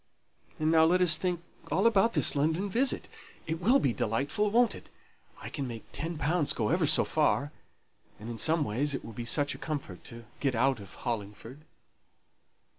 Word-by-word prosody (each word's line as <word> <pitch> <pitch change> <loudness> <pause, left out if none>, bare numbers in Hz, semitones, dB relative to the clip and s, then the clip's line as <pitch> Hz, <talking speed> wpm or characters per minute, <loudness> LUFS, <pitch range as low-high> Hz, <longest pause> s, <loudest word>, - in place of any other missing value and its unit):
And 155 +1 +1
now 160 -1 +5
let 180 +3 +3
us 175 -4 +4
think 175 +1 -2 0.3
all 195 - +1
about 230 0 +4
this - - +3
London 160 +7 0
visit. 260 +6 +1 0.4
It 160 +1 -4
will 240 +9 +4
be 130 - 0
delightful, 140 - -1
won't 235 +2 +3
it? - - -12 0.5
I - - -8
can 140 -3 -4
make 115 -2 -7
ten 165 +2 -5
pounds 150 +1 +1
go 110 - -1
ever 165 0 +2
so 155 - +6
far; 145 -2 +1 0.7
and 110 - -9
in 115 -1 -6
some 160 -1 +2
ways 140 +4 -1
it - - -6
will 115 - -9
be 120 +2 -6
such 145 +4 +1
a - - -11
comfort 140 - -6
to 115 0 -10
get 135 -3 0
out 130 +1 +1
of 100 -2 -11
Hollingford." 115 +3 -6
150 Hz, 190 wpm, -29 LUFS, 120-175 Hz, 0.7 s, so